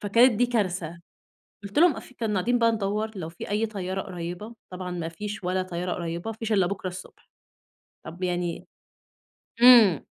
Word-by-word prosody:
فكانت 235 +5 +5
دي 235 +3 +2
كارثة. 180 -8 -2 0.6
قُلت 200 +8 -1
لهم 345 -3 +6
قاف 260 - -11
كنا 225 -3 -1
قاعدين 240 +6 +1
بقى 230 0 +4
ندوّر 215 0 -2
لو 165 -4 -5
في 165 - -9
أي 210 +2 +1
طيارة 195 -3 -4
قريبة، 180 +5 -7 0.2
طبعًا 180 0 -5
ما 170 -2 -4
فيش 200 +4 -6
ولا 185 +1 0
طيارة 180 0 -4
قريبة، 170 +5 -4
ما 220 - -11
فيش 225 -1 -4
إلا 190 -3 +3
بكرة 195 -1 -4
الصبح. 185 0 -10 0.8
طب 175 +3 -9
يعني 175 -1 -2 1.0
إمم، 230 - +8
195 Hz, 170 wpm, -26 LUFS, 180-220 Hz, 1.0 s, إمم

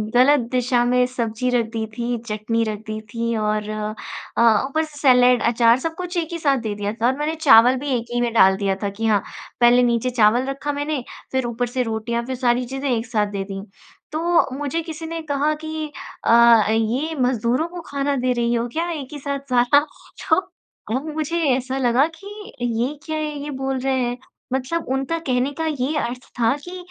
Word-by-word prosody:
ग़लत 280 +4 +6
दिशा 250 -1 +2
में 250 0 +3
सब्ज़ी 245 -1 -2
रख 235 - +1
दी 225 -1 -2
थी, 240 0 -1
चटनी 220 +2 -1
रख 215 -2 -3
दी 215 0 -4
थी 230 0 -1
और 215 0 -1
अ, 215 +1 0
ऊपर 315 +3 0
से 305 -2 -10
सैलेड 250 -3 +5
अचार 235 0 +4
सब 325 +4 -3
कुछ 360 0 -5
एक 330 -1 -2
ही 335 - -4
साथ 280 -3 +2
दे 210 - -2
दिया 205 +1 -3
था 235 - +4
और 260 +2 +1
मैंने 305 +2 -1
चावल 255 -5 +6
भी 285 +2 -4
एक 235 - -5
ही 240 - +1
में 240 -1 0
डाल 190 -4 +6
दिया 195 -1 0
था 200 - 0
कि 220 +3 -5
हाँ 210 -2 +3 0.4
पहले 245 +1 +6
नीचे 240 +1 +1
चावल 240 +1 +3
रखा 275 +2 -3
मैंने, 290 -1 -2 0.3
फिर 260 -1 0
ऊपर 240 +1 -2
से 250 +1 -1
रोटियाँ 235 +1 -2
फिर 260 +1 -3
सारी 245 0 +1
चीज़ें 270 +3 -4
एक 230 -1 0
साथ 215 -3 0
दे 195 -1 -3
दी। 195 0 -5 0.5
तो 335 +1 +2
मुझे 290 +3 -2
किसी 320 0 -7
ने 330 0 -4
कहा 295 0 0
कि, 315 -1 -4 0.3
"अ, 235 -1 +6
ये 240 +9 0
मज़दूरों 250 +5 +1
को 350 0 -8
खाना 280 0 -1
दे 255 -1 0
रही 240 -1 0
हो 235 0 0
क्या 335 +2 -1
एक 295 -5 -5
ही 295 - -6
साथ 280 0 -3
सारा?" 245 +3 +5 0.5
तो 320 - +5 0.6
अब 270 +4 -2
मुझे 315 +2 -1 0.2
ऐसा 260 +1 -3
लगा 255 +2 +3
कि 395 +4 -13 0.3
ये 240 +3 0
क्या 315 -1 -3
है 305 -1 -2
ये 295 - -5
बोल 265 -1 -2
रहे 265 +1 0
हैं, 245 0 -1 0.4
मतलब 270 +6 -2
उनका 270 +5 -1
कहने 255 +2 +1
का 320 +2 -3
ये 295 -1 -1
अर्थ 250 +2 -4
था 230 +3 +3
कि 360 +1 -7
250 Hz, 205 wpm, -21 LUFS, 235-290 Hz, 0.6 s, ग़लत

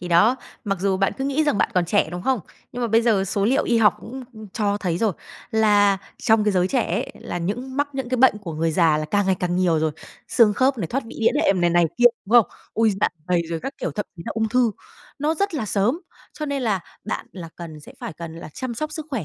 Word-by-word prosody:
Thì 175 - -6
đó, 210 +10 +5 0.3
mặc 195 -2 -1
dù 195 0 +1
bạn 195 0 +1
cứ 265 - -2
nghĩ 280 +3 +1
rằng 295 -9 +1
bạn - - +2
còn 180 - +3
trẻ, 180 -1 +2
đúng 175 +1 -5
không? 260 -1 +1 0.3
Nhưng 245 0 -4
mà 235 - 0
bây 225 +1 +4
giờ 215 -5 +3
số 195 +1 -1
liệu 255 +5 +2
y 235 - +2
học 215 -2 +5
cũng 260 +2 -8 0.3
cho 205 -2 0
thấy 175 -4 -1
rồi, 220 -1 +1 0.4
là 205 -3 +4 0.2
trong 220 -1 +3
cái 210 - +2
giới 180 -1 +2
trẻ 255 +1 +2
ấy, 220 +7 -1
là 175 - -4
những 245 +10 -4
mắc 285 0 +1
những 265 -2 -4
cái 255 - 0
bệnh 250 -4 +5
của 185 -6 -7
người 165 +1 0
già 160 -2 +3
là 155 - -2
càng 200 +5 +1
ngày 190 - +3
càng 175 -1 0
nhiều 175 -3 +2
rồi: 155 0 +1 0.4
xương 225 -3 +5
khớp 260 +2 +2
này, 175 - -2
thoát 265 +10 -2
vị - - -10
đĩa 225 - +4
đệm 185 -2 +3
này, 175 - +3
này 175 0 +4
kia, 245 - +3 0.2
đúng 210 - -6
không? - - -13 0.3
Ôi! 225 0 +3
Dạ - - +4 0.2
dày 175 -2 +2
rồi 165 -1 -2
các 275 - -5
kiểu, - - -2
thậm 210 - -4
chí 165 - -8
là - - -3
ung 220 -1 0
thư, 245 0 +3 0.5
nó 300 +3 +1
rất 400 +2 -1
là 260 -8 -2
sớm. 210 - +1 0.3
Cho 305 - -5
nên 280 -2 -2
là 210 -6 +1 0.2
bạn - - -4
là 175 -4 -8
cần 160 -3 -8
sẽ - - -13
phải - - -5
cần 165 +1 -8
là 165 - -8
chăm 255 -2 -4
sóc 305 +6 -4
sức 310 -1 -6
khỏe 245 - -2
210 Hz, 270 wpm, -23 LUFS, 180-250 Hz, 0.5 s, đó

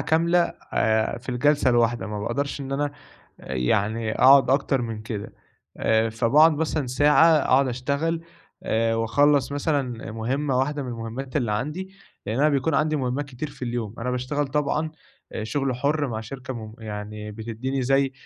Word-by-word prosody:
كاملة، 170 +2 +2 0.3
آآ 110 +1 +1
في 125 - -18
الجلسة 140 +2 +2
الواحدة، 120 -4 +2
ما 105 0 -4
باقدرش 140 +7 -2
إن 135 0 -5
أنا، 145 +1 0 0.5
يعني 100 - -1
أقعد 135 +2 +6
أكتر 135 -1 +2
من 110 -2 -5
كده، 110 -2 -6 0.4
آآ، 110 0 +2
فباقعد 130 +8 +5
مثلًا 155 -2 -1
ساعة، 145 +5 +5
أقعد 135 -1 +3
أشتغل، 140 +7 -1 0.4
آآ 115 0 +1
وأخلص 140 +5 +2
مثلًا 140 -6 -2
مهمَّة 130 +4 -1
واحدة 145 +2 0
من 130 - -6
المهمّات 120 +4 -5
اللي 120 -7 0
عندي، 150 - -3 0.4
لأن 110 +4 -2
أنا 150 - +5
بيكون 140 +1 +1
عندي 155 +1 +2
مهمّات 130 +1 -1
كتير 135 +3 -6
في 140 - -16
اليوم، 120 -3 -3
أنا 125 +2 -2
باشتغل 130 +4 -1
طبعًا، 150 +2 0 0.4
أ 110 - -4
شغل 135 +3 -1
حُر 145 +3 0
مع 110 -2 -3
شركة 130 +3 -7
م 110 -2 -8
يعني 105 -1 -6
بتدّيني 115 +5 -3
زي 135 +1 +2
130 Hz, 160 wpm, -24 LUFS, 115-145 Hz, 0.5 s, أقعد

